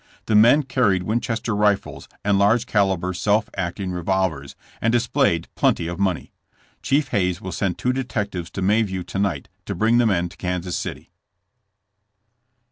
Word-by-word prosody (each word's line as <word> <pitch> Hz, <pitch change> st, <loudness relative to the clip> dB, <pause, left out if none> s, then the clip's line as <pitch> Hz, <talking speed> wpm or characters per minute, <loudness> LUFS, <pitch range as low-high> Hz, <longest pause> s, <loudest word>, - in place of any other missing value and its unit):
The 110 Hz, -, -1 dB
men 120 Hz, +8 st, +6 dB
carried 120 Hz, -9 st, +1 dB
Winchester 115 Hz, +1 st, -1 dB
rifles 105 Hz, -1 st, 0 dB, 0.2 s
and 100 Hz, -1 st, +3 dB
large 110 Hz, +4 st, +3 dB
caliber 95 Hz, -5 st, +1 dB
self 105 Hz, +3 st, +1 dB
acting 95 Hz, 0 st, -3 dB
revolvers, 90 Hz, -6 st, -1 dB, 0.3 s
and 115 Hz, -, +2 dB
displayed 120 Hz, -, +1 dB
plenty -, -, +1 dB
of 85 Hz, +2 st, -5 dB
money. 95 Hz, -4 st, -1 dB, 0.5 s
Chief 140 Hz, 0 st, +1 dB
Hayes 90 Hz, -5 st, 0 dB
will 95 Hz, -, -6 dB
send 95 Hz, -3 st, -2 dB
two 125 Hz, -, 0 dB
detectives 105 Hz, -9 st, -3 dB
to 95 Hz, -, -3 dB
Mayview 95 Hz, -3 st, +1 dB
to 90 Hz, +2 st, -4 dB
night 90 Hz, -9 st, -1 dB, 0.2 s
to -, -, -3 dB
bring 115 Hz, +2 st, +3 dB
the 120 Hz, -, +4 dB
men 90 Hz, -4 st, +1 dB
to -, -, -16 dB
Kansas 90 Hz, -1 st, -3 dB
City. -, -, -6 dB
100 Hz, 155 wpm, -22 LUFS, 90-115 Hz, 0.5 s, men